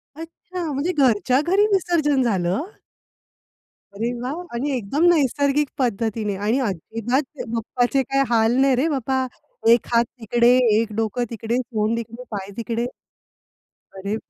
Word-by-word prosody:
अच्छा! 335 +3 -7
म्हणजे 285 +7 -1
घरच्या 255 -1 +3
घरी 395 +3 +4
विसर्जन 315 -8 +2
झालं? 190 -4 0 1.4
अरे 230 +4 -1
वाह! 275 +7 -3 0.2
आणि 275 +5 -1
एकदम 250 +8 -1
नैसर्गिक 285 -1 +2
पद्धतीने. 220 -4 -1
आणि 235 +6 +2
अजिबात 230 - -2 0.3
बाप्पाचे 245 +3 0
काय 275 +2 +1
हाल 230 0 +3
नाही 270 -1 +4
रे 270 +6 +1
बाबा, 265 0 0 0.5
एक 235 - +1
हात 235 0 +4
तिकडे, 235 +2 +3 0.3
एक 225 -2 -2
डोकं 225 +3 -1
तिकडे, 230 +1 -2
सोंड 230 -2 -1
तिकडे, 235 +2 -7
पाय 195 0 -5
तिकडे. 235 +1 -2 1.1
अरे! 200 +2 -3
240 Hz, 130 wpm, -22 LUFS, 225-275 Hz, 1.4 s, घरी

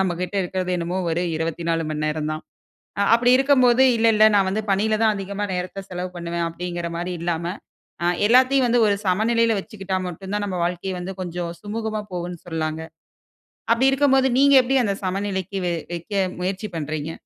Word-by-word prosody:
நம்ம 185 -2 +1
கிட்ட 180 +2 -4
இருக்கிறது 185 0 -3
என்னமோ 175 +2 -2
ஒரு 170 +2 0
24 165 +1 -1
மணி 155 0 -2
நேரம் 155 0 -2
தான். 155 - -5 0.6
அ - - +4
அப்படி 245 +1 +3
இருக்கும்போது, 260 -2 +4
"இல்ல 225 0 +2
இல்ல 215 0 +5
நான் 195 -1 +3
வந்து 215 +3 -1
பணியில 215 +3 +2
தான் 215 -1 +4
அதிகமா 200 +1 -4
நேரத்தை 185 +2 -4
செலவு 180 0 -4
பண்ணுவேன்" 170 0 -3
அப்படிங்கிற 175 0 -4
மாதிரி 175 +1 -3
இல்லாம, 170 -1 -2 0.6
அ - - +1 0.2
எல்லாத்தையும் 255 +2 +4
வந்து 240 0 +3
ஒரு 200 - +3
சமநிலையில 225 +4 +2
வச்சுக்கிட்டா 195 -1 -4
மட்டும் 190 +3 -8
தான் 205 0 -1
நம்ம 185 -2 -3
வாழ்க்கை 180 +2 -2
வந்து 180 +2 -5
கொஞ்சம் 175 -1 -4
சுமூகமாக 215 0 -4
போகும்னு 175 -1 -4
சொல்லாங்க. 160 -1 -3 0.9
அப்படி 250 +4 +4
இருக்கும்போது 270 -1 +3
நீங்க 280 0 +5
எப்படி 265 +2 +1
அந்த 200 -3 0
சமநிலைக்கு 190 0 -2
வை 175 - 0 0.2
வைக்க 175 +4 -7 0.3
முயற்சி 190 +3 -3
பண்றீங்க? 155 0 -3
190 Hz, 175 wpm, -22 LUFS, 170-220 Hz, 0.9 s, இல்ல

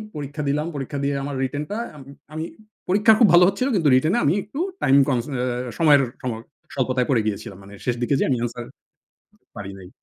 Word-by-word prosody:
পরীক্ষা 145 0 -5
দিলাম। 150 +3 0
পরীক্ষা 140 0 -4
দিয়ে 140 0 0
আমার 145 0 -4
রিটেন 145 +3 -2
টা 210 - -2 0.2
আম 145 - -11 0.3
আমি 155 +1 -3 0.5
পরীক্ষা 205 +4 +5
খুব 230 - +7
ভালো 175 +1 +8
হচ্ছিলো 200 +8 0
কিন্তু 165 -6 +3
রিটেনে 155 - +2
আমি 145 - +3
একটু 240 +8 -8 0.2
টাইম 135 - +5
কমস 125 -4 0
অ্যা 125 -1 -2
সময়ের 150 -4 +6 0.2
সম 130 -3 -2 0.4
স্বল্পতায় 130 -1 0
পড়ে 125 -5 +3
গিয়েছিলাম। 100 -2 -4
মানে 100 +1 -13
শেষ 125 - 0
দিকে 120 +4 +1
যেয়ে - - +1
আমি 130 - +2
এন্সার 120 0 -4 0.9
পারি 100 -1 -6
নাই। 90 -1 -12
140 Hz, 195 wpm, -22 LUFS, 125-155 Hz, 0.9 s, ভালো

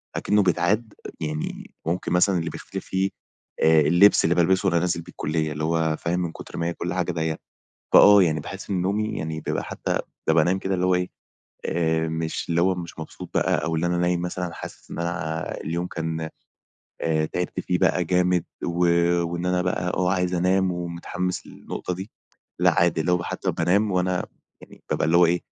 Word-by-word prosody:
أكنّه 105 0 +2
بيتعاد، 105 +5 +1 0.3
يعني 75 0 -4
ممكن 85 +2 -2
مثلًا 90 +1 +4
اللي 85 0 -2
بيختلِف - - -7
فيه 95 +1 0 0.5
آآ 80 -1 +6
اللِّبس 85 +7 +5
اللي 85 - +3
بالبِسه 95 +3 +3
وأنا 85 -2 +3
نازل 85 0 0
بيه - - -12
الكُلّية، 80 0 -2
اللي 75 +1 -4
هو 80 0 +1
فاهم 85 +1 -1
من 85 -2 -2
كتر - - -10
ما 85 - -1
هي 85 - -1
كلّ 85 +1 -4
حاجة 90 -1 0
دي 80 -2 -1 0.6
فآه، 100 -1 +9
يعني 80 -3 +1
باحس 95 +7 -8
إن 95 -3 0
نومي 105 +4 0
يعني 80 0 -3
بيبقى - - -2
حتى - - -2 0.3
بابقى 80 -1 +5
نايم 95 +4 +1
كده 95 0 -1
اللي 90 0 0
هو 90 0 +3
إيه، 90 0 -1 0.6
آآ 80 -1 +1
مش 80 +1 -3
اللي 85 0 +2
هو 95 +1 +3
مش 85 -2 -7
مبسوط 80 - -8
بقى - - +1
أو 80 0 -1
اللي 80 +2 0
أنا 90 0 0
نايم 90 0 +1
مثلًا 90 0 -3
حاسس - - -10
إن - - -5
أنا 80 -2 -3
اليوم 85 +3 -2
كان 80 -1 -3 0.7
آآ 80 -1 +1
تعِبت 90 +3 -3
فيه 90 - 0
بقى 90 - +2
جامد، 90 0 +2 0.2
و 85 +1 +1 0.4
وإن 85 +1 -3
أنا 90 0 +1
بقى 90 0 -1
آه، 90 -1 +1
عايز 90 -1 0
أنام 95 +1 +2
ومتحمّس 90 +1 -4
للنقطة 90 - -5
دي، 95 +4 -7 0.5
لأ، - - +5
عادي، 85 -2 +3
لو 90 0 +1
حتى - - -2
بانام 100 +4 +2
وأنا 90 0 0 0.4
يعني - - -16
بابقى - - +1
اللي 80 +2 +4
هو 90 - +7
إيه، 85 +1 +1
85 Hz, 195 wpm, -24 LUFS, 80-90 Hz, 0.7 s, فآه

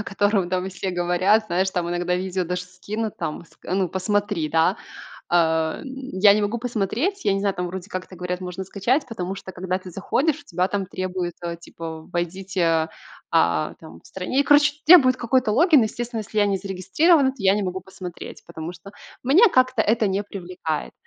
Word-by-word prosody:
о - - -4
котором 200 -2 +1
там 185 0 -1
все 185 +1 -4
говорят, 180 +5 +2
знаешь, 185 +2 0
там 175 -2 -2
иногда 175 0 -1
видео 185 0 -2
даже 180 +1 -3
скинут, 205 +4 -5
там 155 +3 -4
ска 180 - -7
ну, 190 -2 +1
посмотри, 190 -4 -1
да. 165 +5 +2 0.5
А, 160 -2 +2
м, - - -10 0.3
я 200 +2 +6
не 210 - +1
могу 215 +3 -1
посмотреть, 245 - -2
я 195 - +3
не 195 - 0
знаю, 200 -1 0
там 180 - -2
вроде 190 +2 -7
как-то 185 0 -6
говорят, 180 +1 -4
можно 180 +1 -5
скачать, 240 - 0
потому 190 -5 -4
что 190 - -9
когда 185 +1 -3
ты 185 - -10
заходишь, 275 - 0
у - - -20
тебя 180 -2 0
там 200 -1 -2
требуют, 185 -2 -3
а, 170 -1 -4
типа 165 -1 -8
войдите, 175 -2 0 0.4
а, 80 -1 +2
там 85 +1 -12
в - - -30
стране, 190 +9 -1
и - - -1
короче, 290 0 +5
требуют 270 -7 +8
какой-то 245 -1 +1
логин. 315 - +5
Естественно, 230 +1 -3
если 215 0 -6
я 205 - +5
не 195 -1 +1
зарегистрирована, 200 - +2
то - - -18
я 195 0 +4
не 210 - -1
могу 185 0 -3
посмотреть, 185 -2 -9
потому 170 0 -7
что 190 +4 -13 0.3
меня 360 - +6
как-то 255 -2 +3
это 220 -1 +2
не 195 +2 -1
привлекает. 180 -6 -5
190 Hz, 195 wpm, -23 LUFS, 180-215 Hz, 0.5 s, требуют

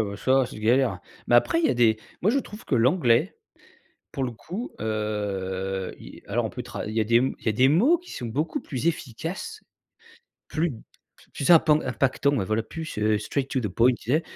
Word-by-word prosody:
ouais, 100 - -6
ça 130 +4 +3
c'est - - -10
galère, 120 +4 +2 0.3
mais 120 - +6
après, 330 - +3
il 335 - +3
y - - +2
a - - +1
des 115 -2 +4 0.2
moi 210 +6 +2
je 280 - +2
trouve 210 -1 -11
que 135 - -1
l'anglais 120 -1 +3 0.8
pour 135 - -2
le 125 - -2
coup, 195 - -7
heu, 95 -3 -3
i - - -12
alors 115 +3 0
on - - -6
peut 125 - -6
tra 115 -4 -6
il 110 - -5
y 115 - +2
a 110 - +2
des 115 +2 +3
il 130 +3 0
y - - +1
a - - 0
des 130 +5 +4
mots 250 - +4
qui 360 - -15
sont 120 - -6
beaucoup 150 +8 -2
plus 135 +3 -4
efficaces. 165 - -4 0.9
Plus 160 0 -1 0.6
plus 140 - 0
impan 155 -2 +6
impactant, 135 +3 0
ouais 100 - 0
voilà, 110 +3 0
plus, 160 +5 -7
heu, 105 0 +2
straight 135 +5 -2
to 130 - 0
the 115 - -2
point 120 +7 +3
tu 120 +2 -4
sais? 155 - +3
125 Hz, 215 wpm, -25 LUFS, 110-155 Hz, 0.9 s, mais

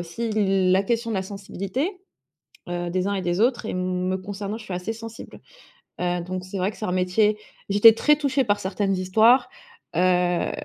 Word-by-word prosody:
aussi 195 +7 -4
la 195 -2 +2
question 230 +2 -1
de - - -1
la 190 - -1
sensibilité, 200 - -4 0.7
heu, 175 0 -3
des 185 +2 -1
uns 200 - -1
et 190 - -2
des 175 +3 -1
autres 240 -1 +1
et - - -3
me 185 0 -1
concernant, 200 +2 -5
je 225 - -11
suis 195 - -7
assez 180 +5 -3
sensible, 225 0 -10 0.6
heu, 180 0 0
donc 185 +1 -5
c'est 190 +1 -6
vrai 185 +2 0
que - - -15
c'est 215 - -3
un - - -2
métier 210 +4 +2 0.3
j'étais 205 +3 +8
très 300 +5 +3
touchée 280 -2 +1
par 205 -2 +1
certaines 195 +1 -1
histoires, 220 +7 +4 0.5
heu 180 -1 +2
195 Hz, 190 wpm, -24 LUFS, 185-225 Hz, 0.7 s, j'étais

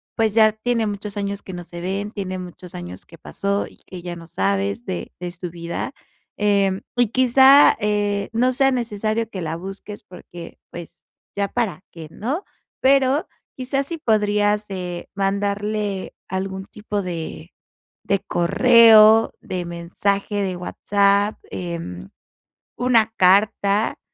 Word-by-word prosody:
pues 220 -2 +1
ya 220 -1 +6
tiene 230 +1 -1
muchos 205 0 -4
años 200 0 -3
que 190 - -8
no 175 0 -6
se 175 0 -9
ven, 195 +3 -3
tiene 185 -3 -4
muchos 180 0 -10
años 90 +1 -8
que 165 - -15
pasó, 200 +5 -2
y - - -18
que 180 -2 -8
ya 175 0 -6
no 165 -1 -12
sabes 100 - -1
de 85 -1 -5
de 175 -1 -4
su 180 0 -6
vida. 170 0 -5 0.4
Em, 200 -2 +2 0.2
y 245 -1 +4
quizá, 265 +4 +6
eh, 205 -1 0
no 250 +3 +2
sea 270 +1 +3
necesario 225 -2 -1
que 190 -4 -6
la 160 -1 -3
busques, 195 +4 -8
porque 175 -3 -11
pues, 170 -1 -11 0.3
¿ya 200 0 0
para 205 -4 -2
qué?, 165 -2 -9
¿no? 275 - -3 0.4
Pero 270 +2 +3 0.3
quizá, 265 +1 -1
si 330 +4 -5
podrías, 210 -5 +1
eh, 180 -2 -5
mandarle 200 0 -2
algún 190 +1 -4
tipo 210 0 -4
de 170 -2 -6 0.6
de 200 - +2
correo, 220 +3 +6
de 180 -1 -4
mensaje 195 +4 -2
de 185 -2 -2
WhatsApp, 200 +3 +1
em, 165 - -6 0.7
una 230 -3 +3
carta, 200 +2 +3
200 Hz, 140 wpm, -21 LUFS, 180-220 Hz, 0.7 s, ya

